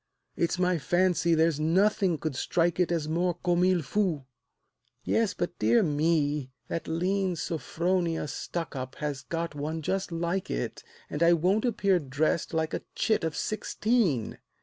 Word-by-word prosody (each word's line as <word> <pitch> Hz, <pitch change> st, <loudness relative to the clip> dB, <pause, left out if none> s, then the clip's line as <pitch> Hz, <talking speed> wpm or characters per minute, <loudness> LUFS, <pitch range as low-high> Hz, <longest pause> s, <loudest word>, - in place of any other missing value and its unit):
It's 170 Hz, +1 st, 0 dB
my 180 Hz, -1 st, +2 dB
fancy, 175 Hz, +2 st, +2 dB
there's 160 Hz, -1 st, +2 dB
nothing 185 Hz, +2 st, +2 dB
could 155 Hz, -2 st, -3 dB
strike 170 Hz, +5 st, 0 dB
it 180 Hz, -1 st, +2 dB
As 165 Hz, -3 st, 0 dB
more 175 Hz, +2 st, 0 dB
comme 175 Hz, 0 st, +1 dB
il 185 Hz, -3 st, +2 dB
faut" 180 Hz, -6 st, 0 dB, 0.8 s
"Yes, 225 Hz, -4 st, +1 dB
but, 175 Hz, -, -3 dB
dear 115 Hz, +2 st, +4 dB
me, 150 Hz, -3 st, +1 dB, 0.2 s
that 165 Hz, -, -3 dB
lean 185 Hz, +3 st, 0 dB
Sophronia 170 Hz, +1 st, -1 dB
Stuckup 140 Hz, -5 st, -5 dB
has 145 Hz, -3 st, -3 dB
got 165 Hz, -1 st, -3 dB
one 155 Hz, +2 st, -4 dB
just 190 Hz, +3 st, -1 dB
like 170 Hz, +3 st, -2 dB
it, -, -, -3 dB, 0.2 s
And 150 Hz, -, -5 dB
I 170 Hz, +1 st, +6 dB
won't 185 Hz, +7 st, +2 dB
appear 200 Hz, -6 st, +2 dB
dressed 150 Hz, +3 st, -1 dB
like 160 Hz, 0 st, -1 dB
a -, -, -2 dB
chit 220 Hz, -6 st, +1 dB
of 160 Hz, -1 st, -1 dB
sixteen." 215 Hz, -, 0 dB
170 Hz, 150 wpm, -28 LUFS, 155-185 Hz, 0.8 s, I